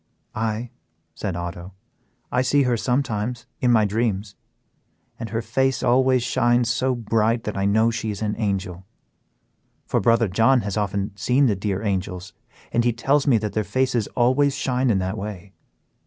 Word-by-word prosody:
"Aye," 115 Hz, +2 st, -3 dB, 0.4 s
said 95 Hz, +2 st, -4 dB
Otto, 85 Hz, +1 st, -6 dB, 0.6 s
"I 125 Hz, -, +2 dB
see 140 Hz, +2 st, +3 dB
her 125 Hz, -2 st, +1 dB
sometimes 125 Hz, -1 st, -1 dB
in 125 Hz, -, +2 dB
my 110 Hz, -3 st, +4 dB
dreams, 105 Hz, -2 st, -1 dB, 0.9 s
and 115 Hz, -, -5 dB
her 115 Hz, +1 st, -2 dB
face 130 Hz, +4 st, 0 dB
always 130 Hz, 0 st, +3 dB
shines 120 Hz, -1 st, +2 dB
so 130 Hz, +1 st, 0 dB
bright 115 Hz, 0 st, 0 dB
that 105 Hz, -, -4 dB
I 100 Hz, 0 st, -1 dB
know 110 Hz, +3 st, +3 dB
she 115 Hz, -1 st, -3 dB
is 105 Hz, +1 st, -4 dB
an 105 Hz, -1 st, -1 dB
angel; 95 Hz, -4 st, -2 dB, 1.0 s
for -, -, 0 dB
brother 115 Hz, -1 st, +3 dB
John 115 Hz, +7 st, +3 dB
has 100 Hz, -2 st, -4 dB
often 100 Hz, -1 st, -2 dB
seen 125 Hz, +9 st, +2 dB
the 110 Hz, -5 st, +2 dB
dear 100 Hz, +1 st, -3 dB
angels, 95 Hz, -2 st, -3 dB, 0.4 s
and 120 Hz, -, +2 dB
he 120 Hz, 0 st, +2 dB
tells 140 Hz, +5 st, +1 dB
me 125 Hz, -5 st, +5 dB
that 105 Hz, -1 st, -3 dB
their 110 Hz, -, 0 dB
faces 120 Hz, +2 st, 0 dB
always 130 Hz, +3 st, +3 dB
shine 130 Hz, -2 st, 0 dB
in 105 Hz, -, +3 dB
that 95 Hz, +3 st, -2 dB
way. 100 Hz, -2 st, -7 dB
115 Hz, 170 wpm, -23 LUFS, 100-125 Hz, 1.0 s, me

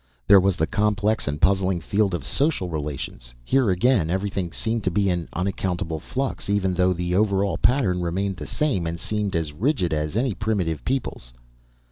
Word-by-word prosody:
There 100 Hz, -, +8 dB
was 95 Hz, -1 st, +2 dB
the 80 Hz, -, +1 dB
complex 105 Hz, +3 st, 0 dB
and 75 Hz, +1 st, -2 dB
puzzling 95 Hz, 0 st, +2 dB
field 100 Hz, +3 st, 0 dB
of 75 Hz, -6 st, -5 dB
social 135 Hz, -, 0 dB
relations 70 Hz, -6 st, -5 dB
here 130 Hz, -, +3 dB
again 95 Hz, -1 st, +2 dB
everything 95 Hz, -1 st, -2 dB
seemed 115 Hz, +3 st, -2 dB
to -, -, +3 dB
be 100 Hz, +1 st, +1 dB
in 85 Hz, -2 st, -2 dB
unaccountable 90 Hz, -2 st, -2 dB
flux, 130 Hz, -, -4 dB
even 100 Hz, -2 st, +1 dB
though 90 Hz, 0 st, +3 dB
the 90 Hz, 0 st, -2 dB
over 100 Hz, 0 st, +2 dB
all 100 Hz, -, -1 dB
pattern 100 Hz, -9 st, +2 dB
remained 95 Hz, +2 st, -1 dB
the -, -, -7 dB
same 135 Hz, -, 0 dB
and 85 Hz, +1 st, -4 dB
seemed 105 Hz, -1 st, -2 dB
as 80 Hz, -3 st, -1 dB
rigid 95 Hz, -, 0 dB
as 75 Hz, +3 st, -2 dB
any 125 Hz, -1 st, +1 dB
primitive 95 Hz, -8 st, -1 dB
people's. 125 Hz, -, -3 dB
95 Hz, 180 wpm, -24 LUFS, 85-105 Hz, -, There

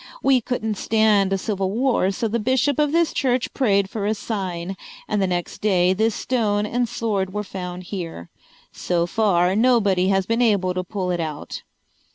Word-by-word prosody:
We 265 Hz, -2 st, +4 dB
couldn't 220 Hz, -4 st, -3 dB
stand 215 Hz, -3 st, +3 dB
a 195 Hz, -, +2 dB
civil 195 Hz, -1 st, -2 dB
war 235 Hz, -2 st, +1 dB
so 225 Hz, +4 st, -2 dB
the 230 Hz, +2 st, -1 dB
bishop 260 Hz, +5 st, +1 dB
of 295 Hz, -1 st, +2 dB
this 335 Hz, 0 st, +2 dB
church 255 Hz, -1 st, 0 dB
prayed 200 Hz, -7 st, +2 dB
for 205 Hz, 0 st, -3 dB
a 215 Hz, -, +1 dB
sign, 190 Hz, -4 st, -4 dB, 0.3 s
and 210 Hz, -1 st, 0 dB
the 190 Hz, -, +2 dB
next 175 Hz, -1 st, -3 dB
day 185 Hz, -3 st, +3 dB
this 220 Hz, +3 st, +1 dB
stone 210 Hz, -5 st, 0 dB
and 240 Hz, +2 st, -1 dB
sword 195 Hz, -5 st, -2 dB
were 210 Hz, -, -1 dB
found 180 Hz, -2 st, -6 dB
here. 170 Hz, -, -7 dB, 0.4 s
So 170 Hz, -1 st, -1 dB
far 185 Hz, -2 st, +2 dB
nobody 205 Hz, -6 st, +3 dB
has 195 Hz, -1 st, +2 dB
been 230 Hz, +4 st, 0 dB
able 200 Hz, -6 st, +2 dB
to 185 Hz, 0 st, -2 dB
pull 185 Hz, 0 st, -3 dB
it 175 Hz, -, -1 dB
out." 155 Hz, -3 st, -5 dB
205 Hz, 185 wpm, -22 LUFS, 185-230 Hz, 0.4 s, We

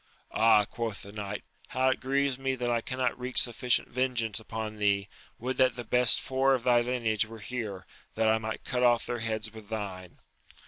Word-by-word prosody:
Ah, 110 Hz, -2 st, +5 dB
quoth 115 Hz, -2 st, -5 dB
the 100 Hz, -, -10 dB
knight, 105 Hz, -1 st, -5 dB, 0.2 s
how 130 Hz, +1 st, +1 dB
it 130 Hz, -, 0 dB
grieves 135 Hz, 0 st, 0 dB
me 135 Hz, 0 st, -1 dB
that 120 Hz, -1 st, -2 dB
I 115 Hz, -1 st, +1 dB
cannot 130 Hz, 0 st, -2 dB
wreak 125 Hz, +1 st, -3 dB
sufficient 125 Hz, 0 st, +3 dB
vengeance 120 Hz, -4 st, -1 dB
upon 110 Hz, -1 st, -6 dB
thee! 100 Hz, -1 st, +1 dB, 0.3 s
would 125 Hz, +2 st, -4 dB
that 130 Hz, -2 st, +3 dB
the 120 Hz, -, -5 dB
best 125 Hz, 0 st, +5 dB
four 135 Hz, 0 st, +2 dB
of 125 Hz, -, -4 dB
thy 120 Hz, -1 st, +4 dB
lineage 115 Hz, -3 st, 0 dB
were 115 Hz, 0 st, -10 dB
here, 105 Hz, -3 st, -5 dB, 0.3 s
that 110 Hz, 0 st, +2 dB
I 110 Hz, 0 st, +3 dB
might 110 Hz, 0 st, -5 dB
cut 125 Hz, -2 st, -1 dB
off 120 Hz, -1 st, +4 dB
their 120 Hz, -, -3 dB
heads 110 Hz, -1 st, -3 dB
with 110 Hz, -2 st, -12 dB
thine 95 Hz, -5 st, -6 dB
115 Hz, 195 wpm, -29 LUFS, 110-125 Hz, 0.3 s, Ah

